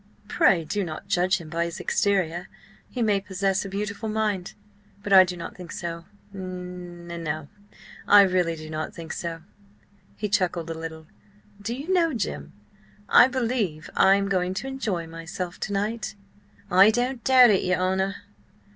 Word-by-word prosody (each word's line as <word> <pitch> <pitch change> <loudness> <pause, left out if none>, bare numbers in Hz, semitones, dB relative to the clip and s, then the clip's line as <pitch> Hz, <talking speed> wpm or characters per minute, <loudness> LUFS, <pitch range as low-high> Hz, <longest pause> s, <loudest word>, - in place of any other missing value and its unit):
Pray, 170 -4 +3
do 200 +6 -1
not 160 -3 -6
judge 180 +1 +2
him 170 -4 -10
by 170 +2 -1
his 170 - -6
exterior. 180 -4 0 0.4
He 245 - -2
may 205 -3 +2
possess 195 0 -1
a 195 - -6
beautiful 205 +2 -4
mind. 210 -4 -2 0.5
But 205 - 0
I 190 -1 +10
do 180 -1 -5
not 170 - -7
think 180 -2 -10
so. 170 -1 -5 0.3
N 180 -2 -7 0.2
no, 155 -2 -4 0.6
I 205 -1 +9
really 180 -3 +1
do 155 -1 -9
not 155 0 -5
think 165 -2 -7
so." 165 -1 -5 0.7
He 210 - -3
chuckled 175 -4 0
a - - -2
little. 160 -1 -7 0.6
"Do 230 +4 -3
you 295 +8 -3
know, 335 -6 +2
Jim, 75 - -4 0.6
I - - +8
believe 230 -11 -2
I 195 0 +6
am 200 0 0
going 185 -1 0
to 270 - -4
enjoy 220 -11 -3
myself 165 +2 -6
to - - -4
night!" 210 +1 -2 0.6
"I 190 +3 +7
don't 245 +2 -1
doubt 255 -3 +7
it, 195 - +3
your 185 0 +1
honour. 190 +2 0
185 Hz, 165 wpm, -25 LUFS, 170-205 Hz, 0.7 s, I